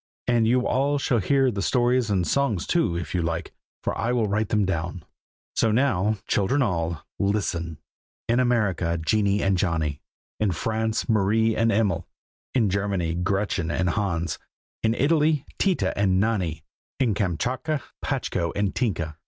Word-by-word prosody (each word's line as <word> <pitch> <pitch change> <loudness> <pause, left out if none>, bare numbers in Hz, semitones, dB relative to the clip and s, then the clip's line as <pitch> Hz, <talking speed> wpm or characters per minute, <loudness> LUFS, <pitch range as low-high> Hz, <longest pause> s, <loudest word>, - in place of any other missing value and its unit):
And 120 -2 +3
you 125 +2 +3
all 140 +3 +1
shall 130 -3 +1
hear 135 +6 +2
the 100 -3 -3
stories 125 0 +2
and 95 -4 +1
songs 120 -9 +1
too, 130 - +1
if 85 - -5
you 90 - +1
like, 85 0 -3 0.3
for - - -1
I 115 - -1
will 115 -3 +1
write 105 +1 0
them 105 -2 +2
down. 85 -2 -3 0.5
So 115 - +3
now, 110 -4 +2
children 130 +8 +2
all, 85 - -2
listen! 90 -6 -1 0.5
in 120 +2 +2
America, 100 -9 +1
Jennie 100 +4 +1
and 95 -2 +2
Johnny; 80 -5 -1 0.4
in 105 -4 +1
France, 110 +5 -1
Marie 110 +1 +2
and 115 0 +2
Emil; 100 -5 +1 0.5
in 110 -7 +3
Germany, 95 -4 0
Gretchen 95 -1 -1
and 90 +1 +1
Hans; 85 -6 -1 0.4
in 110 0 +1
Italy, 150 +1 +2
Tita 190 -3 +1
and 95 -2 +2
Nanni; 95 -8 0 0.4
in 125 -5 +2
Kamschatka, 120 - -1 0.2
Patchko 85 -1 -1
and 100 -1 0
Tinka. 85 - -2
100 Hz, 155 wpm, -25 LUFS, 90-120 Hz, 0.5 s, And